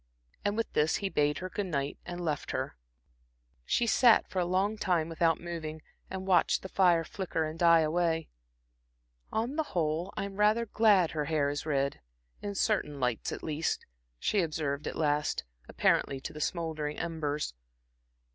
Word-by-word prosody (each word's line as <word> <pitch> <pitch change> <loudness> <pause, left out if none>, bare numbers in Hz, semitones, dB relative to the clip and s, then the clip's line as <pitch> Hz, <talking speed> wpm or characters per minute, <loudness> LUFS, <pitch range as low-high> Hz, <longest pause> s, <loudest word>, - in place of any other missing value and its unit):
And 205 +1 0
with 230 - -2
this 150 +1 +3
he 195 - -1
bade 150 -4 +1
her 185 - -5
good 205 -2 -2
night, 140 -4 -2
and 175 0 -4
left 150 -3 -2
her. - - -3 0.9
She 240 - +2
sat 235 0 +5
for 190 - -3
a 175 - +2
long 190 +4 +1
time 175 -6 0
without 165 0 +2
moving, 160 -2 -6 0.3
and 190 0 -5
watched 190 -2 +3
the 190 - -6
fire 175 -4 +4
flicker 170 -1 -2
and 155 +1 -6
die 170 -1 +6
away. 165 0 +1 1.0
"On 240 +7 -1
the - - +3 0.2
whole, 160 +3 0
I'm 200 0 -4
rather 215 +3 +3
glad 205 -6 +4
her 150 -2 -2
hair 145 -2 +1
is 145 +2 -4
red 140 - 0 0.4
in 205 -1 -4
certain 190 -9 0
lights 125 -3 -1
at - - -6
least," 155 +1 -1 0.3
she 200 - +1
observed 150 -3 -2
at - - -4
last, 150 - 0 0.3
apparently 135 - +2
to - - -6
the 150 - -7
smouldering 155 -3 -2
embers. 150 - -2
165 Hz, 165 wpm, -30 LUFS, 150-190 Hz, 1.0 s, die